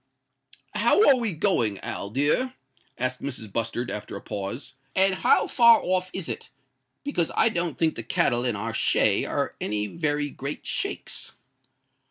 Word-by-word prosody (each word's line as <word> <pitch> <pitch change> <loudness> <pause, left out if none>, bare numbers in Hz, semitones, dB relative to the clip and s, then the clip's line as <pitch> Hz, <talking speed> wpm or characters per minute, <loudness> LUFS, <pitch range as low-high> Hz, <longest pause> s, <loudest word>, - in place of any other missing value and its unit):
"How 235 - +4
are 275 - +7
we 235 -4 +2
going, 135 - +1
Al 100 - -5
dear?" 150 - +1 0.4
asked 125 +1 -1
Mrs. 115 -7 -6
Bustard, 115 +2 -1
after 105 - -5
a - - -5
pause; 105 +5 -5 0.2
"and 190 0 +4
how - - +3
far 235 -2 +6
off 185 0 0
is 190 -4 -5
it? - - -5 0.5
because 230 - -1
I 225 - +4
don't 170 -6 -2
think 160 -1 +2
the - - -5
cattle 120 +1 +1
in 120 -3 0
our 110 +3 -4
shay - - +3
are - - -2
any 105 0 -1
very 145 +2 -1
great 140 +2 -6
shakes." - - -3
145 Hz, 160 wpm, -25 LUFS, 115-190 Hz, 0.5 s, are